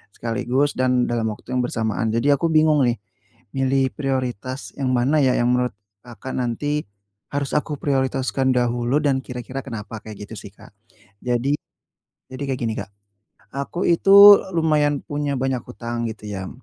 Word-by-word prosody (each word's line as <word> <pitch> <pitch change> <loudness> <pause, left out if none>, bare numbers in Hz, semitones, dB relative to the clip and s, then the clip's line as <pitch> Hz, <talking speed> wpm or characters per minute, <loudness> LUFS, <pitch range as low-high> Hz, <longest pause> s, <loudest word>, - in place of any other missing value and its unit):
sekaligus 125 +5 0
dan 125 -1 +2
dalam 115 -2 0
waktu 110 +3 -7
yang 125 - 0
bersamaan. 110 -4 -1
Jadi 115 +6 +2
aku 140 +4 +2
bingung 155 -4 +4
nih 120 - +1 0.6
milih 135 0 +1
prioritas 130 -2 -3
yang 130 -2 +1
mana 135 +6 +2
ya, 130 -3 +3
yang 120 +1 +2
menurut 125 -3 0 0.3
Kakak 120 +2 -8
nanti 145 +3 -2 0.5
harus 140 -1 -1
aku 150 0 0
prioritaskan 130 -1 0
dahulu 120 +2 +1
dan 135 -3 +2
kira-kira 125 +1 -6
kenapa, 110 -3 -7
kayak 105 -1 -9
gitu 115 - -9
sih, 105 - -11
Kak. - - -16 0.5
Jadi 125 +3 +1 0.8
jadi 140 +2 -5
kayak 130 -1 -2
gini 110 - -1
Kak, 100 -1 -7 0.7
aku 140 +6 -3
itu 200 +4 +8 0.2
lumayan 150 -3 +2
punya 145 -1 -2
banyak 130 -2 -1
hutang 120 -1 -5
gitu 105 -1 -10
ya, 95 -3 -5
130 Hz, 155 wpm, -22 LUFS, 120-140 Hz, 0.8 s, itu